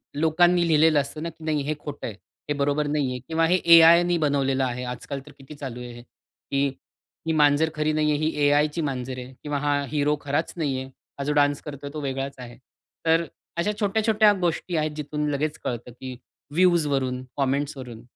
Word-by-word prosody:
लोकांनी 170 +3 +3
लिहिलेलं 155 -1 +4
असतं 150 +3 -4
ना 170 - -2
की 160 - -15
नाही 150 -2 0
हे 150 +2 -1
खोट 145 -1 -7
आहे, 115 - -4 0.4
हे - - +2
बरोबर 145 +1 +1
नाही 145 -3 0
आहे, 125 - -4
किंवा 165 0 +2
हे 180 - +3 0.2
एआयनी 170 +1 +7
बनवलेलं 140 -3 +1
आहे. 125 -1 -2
आजकाल 125 +3 -5
तर 150 - -13
किती 135 +2 -12
चालू 130 -4 -7
आहे 125 - -7
हे, 120 - -11 0.5
की 140 0 +2 0.6
ही 160 - +2
मांजर 150 +1 +4
खरी 150 0 +1
नाहीये, 150 -1 +2
ही 155 +1 0
ए-आयची 150 +3 +2
मांजर 130 -3 -3
आहे 125 +1 -9
किंवा 145 -1 -2
हा 145 0 +1
हीरो 150 0 +2
खराच 145 +3 -1
नाहीये. 135 -4 -1 0.3
हा - - -1
जो 150 - 0
डान्स 145 -1 +2
करतोय 145 -1 -7
तो 155 - -4
वेगळाच 135 0 -3
आहे. 120 -1 -10 0.5
तर 165 +1 +3 0.3
अशा 205 +5 +1
छोट्या-छोट्या 215 0 +3
गोष्टी 175 +1 -1
आहेत 155 0 0
जिथून 150 0 -3
लगेच 150 +2 -1
कळतं 120 0 -4
की 130 +1 -8 0.4
व्हिवजवरून, 145 -8 +2
कॉमेंट्सवरून 135 -3 -2
145 Hz, 185 wpm, -25 LUFS, 135-160 Hz, 0.6 s, एआयनी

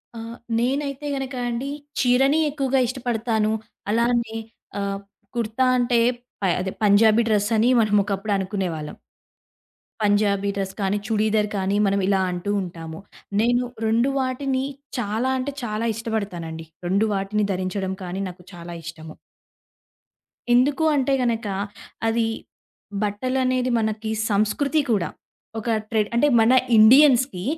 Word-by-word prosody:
ఆ! - - -6 0.4
నేనైతే 275 +3 -1
గనక 270 -1 -4
అండి, 240 +3 -3 0.3
చీరని 270 +4 +4
ఎక్కువగా 275 -2 0
ఇష్టపడతాను. 230 -3 -1 0.4
అలానే 235 0 +1 0.4
ఆహ్, 195 0 -2 0.4
కుర్తా 230 +2 0
అంటే 240 -1 +2 0.4
ప - - -6 0.2
అదే 190 +1 -2
పంజాబీ 215 +2 +5
డ్రెస్సని 215 +2 +2
మనం 215 -2 +2
ఒకప్పుడు 205 +1 -2
అనుకునేవాళ్ళం. 185 -6 -3 1.1
పంజాబీ 205 -1 +2
డ్రెస్ 195 -1 -3
కానీ, 195 +1 +1
చుడీదార్ 215 -1 +1
కానీ 195 +1 0
మనం 200 0 +1
ఇలా 195 -1 +2
అంటూ 180 +3 -3
ఉంటాము. 165 -2 -7 0.4
నేను 245 +2 +2 0.2
2 230 +4 +2
వాటిని 260 0 -1 0.4
చాలా 225 +4 -1
అంటే, 280 +2 -3
చాలా 220 +1 -2
ఇష్టపడతానండి. 180 -8 -4 0.2
2 200 +4 +2
వాటిని 200 +2 0
ధరించడం 190 +1 -2
కానీ 185 +2 -4
నాకు 180 0 -13
చాలా 170 0 -8
ఇష్టము. 160 -1 -9 1.4
ఎందుకు 270 +5 +3
అంటే 275 0 +1
గనక, 230 -3 0 0.6
అది 225 0 +2 0.8
బట్టలనేది 255 +4 0
మనకి 220 0 -2 0.2
సంస్కృతి 215 +9 +1
కూడా. 200 -5 +1 0.5
ఒక 225 +2 -4 0.2
ట్రెడ్ 215 -2 +1
అంటే 265 +5 +4
మన 225 +3 +5 0.2
ఇండియన్స్‌కి 250 -3 +6
220 Hz, 120 wpm, -23 LUFS, 200-250 Hz, 1.4 s, ఇండియన్స్‌కి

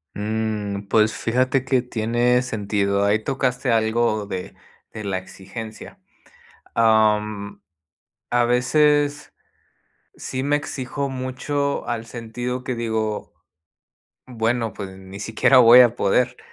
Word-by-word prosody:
Mm, 105 -1 -3
pues 110 0 +3
fíjate 130 +3 0
que 130 -1 +2
tiene 120 +1 +1
sentido. 100 -3 -1
Ahí 105 +2 +2
tocaste 130 -2 -1
algo 110 -1 +1
de 95 -2 -6 0.4
de 110 -1 -7
la 95 -2 -2
exigencia. 100 +4 -9 0.8
Am, 105 -2 +2 0.7
a 120 0 +2
veces 145 +4 +2 0.8
sí 130 0 -4
me 145 +1 +2
exijo 140 -1 -4
mucho, 135 +2 -2
al 115 -1 -3
sentido 120 +2 -5
que 130 - -2
digo 110 -2 -2 1.0
bueno, 115 -2 -1
pues 95 -1 -6
ni 95 +1 -11
siquiera 110 +5 +3
voy 125 +1 +9
a 120 -1 +4
poder. 125 +6 +1
115 Hz, 115 wpm, -22 LUFS, 105-125 Hz, 1.0 s, voy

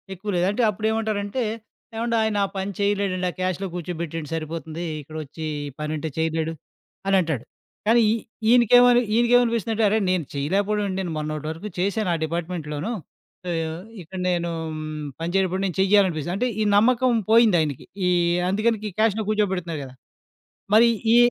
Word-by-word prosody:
ఎక్కువ 200 +3 -7
లేదు. 175 - +2
అంటే, 235 +4 0
అప్పుడేమంటారంటే, 220 +2 -1 0.5
ఏవండాయనా 220 -3 +1
పని 190 +1 -2
చెయలేడండి, 200 -3 0
ఆ - - -18
క్యాష్‌లో 185 +1 -1
కూర్చోబెట్టేయండి 165 -3 -5
సరిపోతుందీ, 165 +1 -5 0.2
ఇక్కడొచ్చీ 155 +1 -7 0.2
ఈ - - -11
పనంటే 155 +1 -3
చేయలేడు 160 0 0 0.5
అనంటాడు, 165 - +2 0.4
కానీ 235 +1 +5
ఈ - - +3 0.4
ఈయనికేమని 245 0 +6
ఈయనికేమనిపిస్తందంటే, 230 -2 +3
అరేయ్, 215 +1 +2
నేను 180 -4 0
చెయలేకపోవడవేంటి, 195 +7 0
నేను 175 -3 -3
మొన్నటి 155 0 -4
వరకు 165 +7 -7
చేశాను 200 +2 0
ఆ - - +1
డిపార్ట్‌మెంట్‌లోను, 165 +1 -3 0.6
ఆహ్, 165 +1 -3 0.2
ఇక్కడ 180 +3 -8
నేనూ 170 -1 0 0.7
పనిచేటప్పుడు 185 +2 0
నేను 185 -2 -3
చెయ్యాలనిపిస్తది. 185 -5 +2
అంటే, 250 +5 0
ఈ - - +3
నమ్మకం 250 +3 +4 0.2
పోయిందాయినికి. 175 - +4 0.2
ఈ - - +3 0.4
అందుకని 215 +3 +1
గీ 210 - -3
క్యాష్‌లో 220 -1 +2
కూర్చోబెడుతున్నారు 185 -7 -1
కదా! 130 -1 -12 0.8
మరి 235 +2 +7 0.3
ఈ, - - +7
190 Hz, 130 wpm, -24 LUFS, 165-215 Hz, 0.8 s, మరి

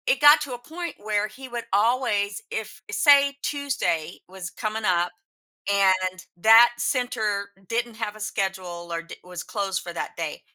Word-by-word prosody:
It - - +3
got 295 +1 +8
to 285 -4 -4
a - - -4
point 330 +5 -6
where 210 0 -1
he 260 +5 -11
would 240 -1 -5
always 210 -2 +1
if 220 -1 -5
uh, - - -7
say, 280 +1 +5
Tuesday 275 - -1
was 185 0 -7
coming 215 +2 -4
up 175 -2 +2 0.6
and 185 -2 +2
that 225 +6 +8
center 215 -7 -1 0.2
didn't 235 +1 -2
have 215 -2 -3
a - - -12
schedule 190 -4 -3
or 165 0 -3
d 165 - -11
was 180 -1 -7
closed 195 -3 -2
for 175 - -7
that - - -5
day, 165 -3 -4
210 Hz, 170 wpm, -25 LUFS, 185-245 Hz, 0.6 s, got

